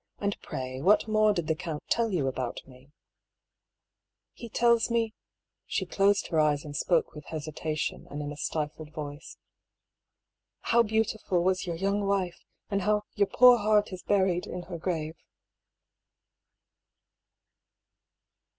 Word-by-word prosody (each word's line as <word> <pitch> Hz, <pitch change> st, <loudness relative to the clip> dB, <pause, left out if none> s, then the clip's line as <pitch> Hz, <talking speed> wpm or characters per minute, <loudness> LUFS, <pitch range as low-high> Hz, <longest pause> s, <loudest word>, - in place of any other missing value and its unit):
And 200 Hz, 0 st, -1 dB
pray 130 Hz, 0 st, -5 dB
what 205 Hz, +7 st, +4 dB
more 215 Hz, 0 st, +4 dB
did 175 Hz, -5 st, -1 dB
the 160 Hz, -, +1 dB
count 155 Hz, -1 st, -5 dB
tell 230 Hz, -1 st, +2 dB
you 170 Hz, -8 st, 0 dB
about 130 Hz, -2 st, -3 dB
me? 130 Hz, +1 st, -17 dB, 0.4 s
" -, -, -61 dB
* -, -, -61 dB, 0.2 s
" -, -, -61 dB
He 235 Hz, -, -9 dB
tells 235 Hz, 0 st, +3 dB
me 230 Hz, -2 st, 0 dB, 0.3 s
" -, -, -60 dB
(she -, -, -1 dB
closed 200 Hz, 0 st, +2 dB
her 160 Hz, -, +1 dB
eyes 150 Hz, -1 st, +2 dB
and 145 Hz, -1 st, -7 dB
spoke 165 Hz, +3 st, +1 dB
with 150 Hz, -1 st, -10 dB
hesitation 155 Hz, 0 st, -4 dB
and 145 Hz, -, -6 dB
in 145 Hz, 0 st, -4 dB
a -, -, -6 dB
stifled 150 Hz, +1 st, -4 dB
voice) 145 Hz, 0 st, -8 dB, 0.6 s
" -, -, -60 dB
how 235 Hz, +1 st, +6 dB
beautiful 220 Hz, -4 st, 0 dB
was 185 Hz, 0 st, +1 dB
your 170 Hz, -, -2 dB
young 200 Hz, +4 st, 0 dB
wife, 190 Hz, -3 st, -1 dB, 0.3 s
and 200 Hz, 0 st, +1 dB
how 210 Hz, +2 st, +1 dB
your 200 Hz, -1 st, +2 dB
poor 245 Hz, +4 st, +7 dB
heart 210 Hz, -1 st, +2 dB
is 180 Hz, -, -7 dB
buried 190 Hz, -3 st, +1 dB
in 180 Hz, -, -5 dB
her 175 Hz, -1 st, -7 dB
grave." 160 Hz, -3 st, -2 dB
180 Hz, 155 wpm, -28 LUFS, 155-210 Hz, 0.6 s, poor